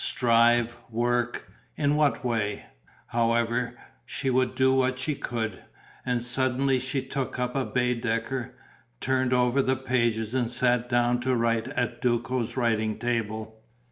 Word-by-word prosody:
Strive? 120 0 +3
Work? 120 +1 -1 0.2
In 145 -1 +1
what 150 -4 +1
way? 110 -4 -1 0.4
However, 115 +1 0 0.3
she 135 - -2
would 130 0 +1
do 130 0 +4
what 130 -1 +2
she 130 +4 -1
could. 110 -7 -4 0.4
And 125 -1 -1
suddenly 130 +2 +1
she 130 +1 -2
took 130 -1 -3
up 125 0 -2
a 135 -1 0
Baedeker, 120 0 -1 0.4
turned 130 -1 0
over 125 +1 +3
the 130 0 +1
pages 120 -4 0
and 125 -3 +1
sat 125 0 +1
down 120 0 +2
to 130 +1 0
write 115 0 +1
at 125 -3 -2
Duco's 120 0 -1
writing 110 -3 +1
table. 110 -2 -3
120 Hz, 140 wpm, -27 LUFS, 115-130 Hz, 0.4 s, do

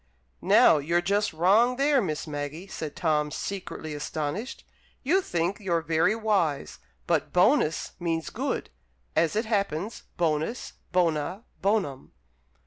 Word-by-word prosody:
'" 65 - -42
"Now, 150 - +6
you're 170 +5 +1
just 205 +3 +1
wrong 205 +10 +4
there, 275 0 +3
Miss 155 -7 -3
Maggie!" 150 +3 -5
said 160 -6 -6
Tom, 150 -3 +1
secretly 180 -3 -5
astonished. 150 - -4 0.4
"You 350 +8 +3
think 175 - -1
you're 170 -5 0
very 165 +6 +2
wise. 195 - 0 0.3
But - - 0
'bonus' 180 - +3
means 165 -2 -2
'good,' - - -3 0.4
as 165 +3 +2
it 220 +2 +1
happens 200 -2 -2
'bonus, 160 +7 -1 0.2
bona, 175 +2 0 0.2
bonum.'" 195 -10 -1
175 Hz, 130 wpm, -27 LUFS, 155-210 Hz, 0.4 s, Now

